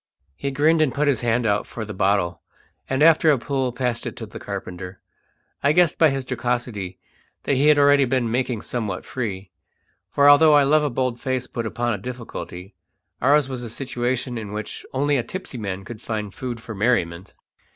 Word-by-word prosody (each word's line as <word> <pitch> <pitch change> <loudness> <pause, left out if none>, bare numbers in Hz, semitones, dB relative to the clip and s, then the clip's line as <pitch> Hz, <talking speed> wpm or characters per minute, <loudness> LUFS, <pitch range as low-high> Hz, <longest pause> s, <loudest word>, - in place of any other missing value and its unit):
He 140 - -3
grinned 155 +4 +3
and 150 -4 +3
put 150 +1 +1
his 140 -4 +2
hand 120 0 +1
out 105 -1 +1
for 110 - -6
the 105 - -7
bottle, 95 -3 +1 0.5
and 135 +2 +2
after 160 0 +6
a 145 - +5
pull 130 0 -1
passed 125 -2 -2
it - - -6
to - - -7
the - - -10
carpenter. 90 +1 -7 0.6
I 145 +1 +3
guessed 175 -1 +3
by 160 - +6
his 135 -1 -3
jocosity 120 -7 -3 0.5
that - - 0
he 140 +3 +3
had 150 -1 +6
already 145 -1 +5
been 125 -3 0
making 125 -2 -1
somewhat 105 -7 -4
free; 100 -6 -5 0.6
for 140 +6 +4
although 150 +1 +7
I 145 - +6
love 150 +2 +4
a 150 - +1
bold 125 -1 -1
face 130 -1 -1
put 115 -2 -4
upon 120 +1 -1
a 105 - -4
difficulty, 110 -5 -7 0.5
ours 140 +2 +4
was 130 -2 -5
a 120 - -5
situation 125 0 -2
in 105 -2 -7
which 105 0 -5
only 145 +2 +1
a 120 - 0
tipsy 160 -2 -7
man 95 -2 -4
could 115 -1 -9
find 105 -3 -4
food 125 -3 -5
for 115 - -7
merriment. 95 -5 0
125 Hz, 195 wpm, -23 LUFS, 110-140 Hz, 0.6 s, although